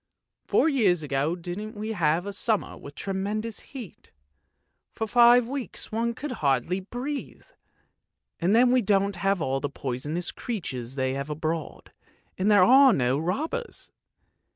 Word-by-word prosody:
Four - - +3
years 205 - +2
ago 145 +3 0
didn't 180 +5 -6
we 215 +1 -5
have 170 -3 +1
a 200 - -5
summer 215 +1 -1
with 140 0 -11
tremendous 205 +3 -3
heat, 245 - -11 0.8
for 220 - -3
five 240 +1 +6
weeks 270 -1 -6
one 230 +1 -1
could 290 +3 -5
hardly 140 +6 +1
breathe! 250 +9 -6 0.9
And 185 +5 +2
then 245 +1 +5
we 255 0 +4
don't 200 -1 +1
have 195 -1 0
all 135 -1 0
the 145 - -3
poisonous 145 +6 -3
creatures 135 - -5
they 130 -1 0
have 140 +2 -4
abroad, 155 +1 -4 0.4
and 190 +3 0
there 205 -3 +6
are 265 +3 +7
no 130 +1 +1
robbers. 290 - -3
195 Hz, 145 wpm, -26 LUFS, 155-230 Hz, 0.9 s, are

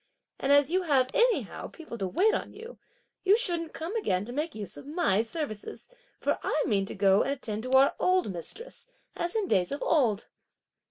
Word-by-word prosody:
and 270 - 0
as 285 +1 +5
you 370 +1 +2
have 270 -7 +2
anyhow 480 0 +1
people 320 -7 -10
to 195 -4 -2
wait 405 - +3
on - - -3
you, 455 +3 -11 0.4
you 395 +3 +5
shouldn't 345 -8 -2
come 335 +7 -5
again 195 - 0
to 240 - -7
make 300 +1 -3
use 210 -2 -7
of - - -11
my 295 - +2
services, 225 -3 -6 0.3
for - - 0
I 300 - 0
mean 195 -3 +1
to - - -7
go 195 0 +4
and - - -1
attend 220 -6 -5
to 255 +2 -4
our 265 +1 +6
old 365 - +2
mistress, 465 - -9 0.3
as 345 +3 -3
in 430 -3 0
days 180 - +1
of 280 - -3
old." 235 -10 +1
285 Hz, 200 wpm, -28 LUFS, 215-360 Hz, 0.4 s, our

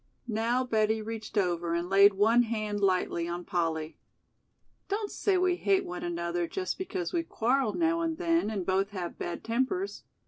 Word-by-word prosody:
Now 235 +3 +1
Betty 220 -2 +1
reached 220 0 -6
over 175 -3 +1
and 170 +1 -1
laid 195 +1 +6
one 225 +5 +4
and 215 -2 -2
lightly 185 -3 +1
on 175 0 -4
Polly. 160 -3 -2 0.9
"Don't 410 +1 -2
say 395 -3 +1
we 365 -1 +2
hate 390 0 +2
no 180 - -6
another 170 0 -2
just 375 - -3
because 375 -1 -3
we 340 - +2
quarrel 255 -6 0
now 335 0 +1
and 325 -1 -1
then 335 - +1
and 200 -5 -3
both 195 +1 +1
have 180 -4 -6
bad 175 - -4
tempers. 260 +12 -1
215 Hz, 170 wpm, -29 LUFS, -, 0.9 s, laid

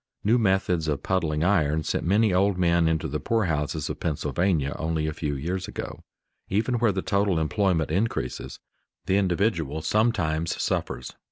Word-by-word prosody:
New 115 +4 +3
methods 95 -5 +1
of 75 -2 -1
puddling 80 -5 0
iron 80 -5 +2
sent - - -1
many 100 +3 +3
old 95 +1 +2
men 85 -2 +3
into 80 -1 0
the 75 +2 -3
poorhouses 80 -8 -1
of - - -5
Pennsylvania 80 -1 0
only 80 -1 -1
a 80 - -2
few 75 -2 -3
years 90 +7 -3
ago. - - -6 0.5
Even 115 +5 0
where 115 -2 +3
the 95 -1 -3
total 100 -3 +1
employment 80 -1 +1
increases, 105 +7 -2 0.5
the 95 - +2
individual 85 -6 0
sometimes 85 -8 +1
suffers. - - -2
85 Hz, 155 wpm, -26 LUFS, 80-100 Hz, 0.5 s, New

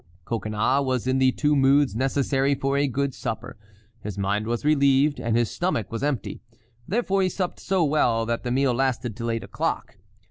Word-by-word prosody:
Coconnas 110 +5 0
was 130 -3 -1
in 130 +1 +1
the 130 -1 +4
two 150 +2 +1
moods 135 -2 +3
necessary 135 +2 +1
for 135 +1 -1
a 140 0 +2
good 140 +1 -1
supper—his 105 -2 -8
mind 100 +2 -1
was 120 +4 -2
relieved 140 -1 +3
and 115 0 0
his 120 -2 +1
stomach 175 - -2
was 115 - -4
empty; 145 -4 -2 0.5
therefore 195 -3 +1
he 185 - +2
supped 180 0 -3
so 190 -2 +1
well 120 -6 +2
that 115 0 -2
the 125 - -3
meal 130 +1 +2
lasted 125 -3 -1
till 115 0 -4
eight 115 0 -2
o'clock. - - -3
130 Hz, 180 wpm, -24 LUFS, 115-140 Hz, 0.5 s, the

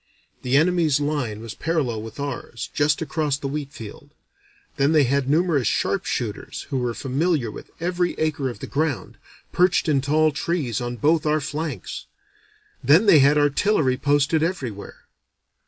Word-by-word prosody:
The 130 +2 +2
enemy's 160 -3 +3
line 145 -8 -2
was 115 -1 -7
parallel 145 -9 -1
with 110 +4 -9
ours, 130 -5 -5
just 145 +1 +1
across 150 -3 -1
the 140 - -5
wheat 140 0 -4
field; 115 +5 -10 0.7
then 140 +2 +3
they 155 -2 +5
had 135 +1 0
numerous 155 - +2
sharpshooters, - - -2
who 135 - 0
were 120 -2 -2
familiar 135 - 0
with - - -11
every 175 +1 -1
acre 150 -4 -1
of 120 - -9
the - - -4
ground, 140 -9 -2 0.3
perched 180 0 +2
in 145 -3 +2
tall 155 +3 +2
trees 150 - -2
on 120 0 -3
both 155 +6 +2
our 155 +1 +2
flanks; 150 0 -5 0.8
then 155 - +5
they 165 -7 +7
had 140 +2 +5
artillery 145 -1 +2
posted 145 +3 +2
everywhere. 130 - -4
145 Hz, 155 wpm, -23 LUFS, 130-155 Hz, 0.8 s, they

